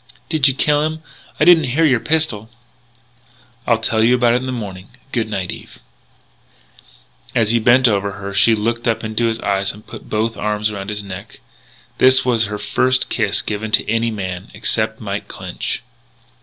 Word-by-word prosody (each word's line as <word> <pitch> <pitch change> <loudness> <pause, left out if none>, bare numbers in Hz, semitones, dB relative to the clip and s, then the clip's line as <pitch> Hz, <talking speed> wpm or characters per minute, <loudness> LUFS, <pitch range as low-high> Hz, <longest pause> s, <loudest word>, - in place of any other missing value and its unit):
"Did 155 -4 +3
you 135 - +2
kill 145 +1 +2
him? 155 +1 -3 0.4
I 155 - +4
didn't 165 -3 +6
hear 165 +1 +4
your 130 -6 +3
pistol." 150 -8 0 1.2
"I'll 115 - +4
tell 110 0 0
you 120 +2 +4
all - - +5
about 120 -1 +3
it - - +3
in 130 +1 -4
the - - -2
morning. 100 -6 -6 0.2
Good 115 -3 -1
night, 95 -4 -3
Eve." - - -10 1.6
As 110 -2 +3
he 120 - +3
bent 125 +3 +5
over 100 -2 0
her, 100 0 -7
she 115 +2 +5
looked 115 +3 -2
up 115 - 0
into 110 +2 0
his 115 0 -2
eyes 100 -1 0
and 105 - -15
put - - -11
both 110 +1 -1
arms 105 0 -1
around 100 -1 -6
his 105 -1 -4
neck. 95 -1 -9 0.6
It 130 0 +5
was 120 -3 +2
her 105 0 -4
first 130 +4 +1
kiss 105 -4 0
given 110 +1 -3
to - - +3
any 115 +1 +1
man, 95 -3 -5
except 110 0 0
Mike 100 -2 -5
Clinch. - - -5
110 Hz, 185 wpm, -18 LUFS, 105-125 Hz, 1.6 s, didn't